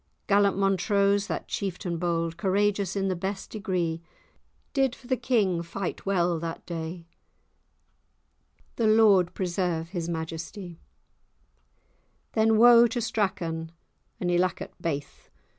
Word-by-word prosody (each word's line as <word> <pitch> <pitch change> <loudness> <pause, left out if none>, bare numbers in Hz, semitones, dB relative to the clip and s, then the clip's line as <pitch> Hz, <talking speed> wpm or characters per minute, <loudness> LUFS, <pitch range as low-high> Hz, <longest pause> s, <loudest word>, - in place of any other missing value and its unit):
Gallant 200 -1 +3
Montrose, 200 +1 +2
that - - -4
chieftan 180 -3 -3
bold, 165 -1 -1
Courageous 200 +1 0
in 195 -1 0
the 185 - 0
best 190 +2 -4
degree, 180 -6 -2 0.7
Did 270 -3 +1
for - - -19
the 255 +1 +1
king 205 -10 +1
fight 175 +3 -5
well 175 -3 +1
that 165 0 -6
day;— 165 0 -5 1.7
The 230 - +2
Lord 210 -5 +5
preserve 175 -3 -1
his 175 -2 -4
majestie! 165 +2 -6 1.5
Then 220 0 +3
woe 235 +1 +8
to 240 +2 -3
Strachan, 190 -8 -2 0.5
and 175 -1 0
Ilacket 175 0 0
baith! 145 -3 -4
190 Hz, 115 wpm, -27 LUFS, 170-205 Hz, 1.7 s, woe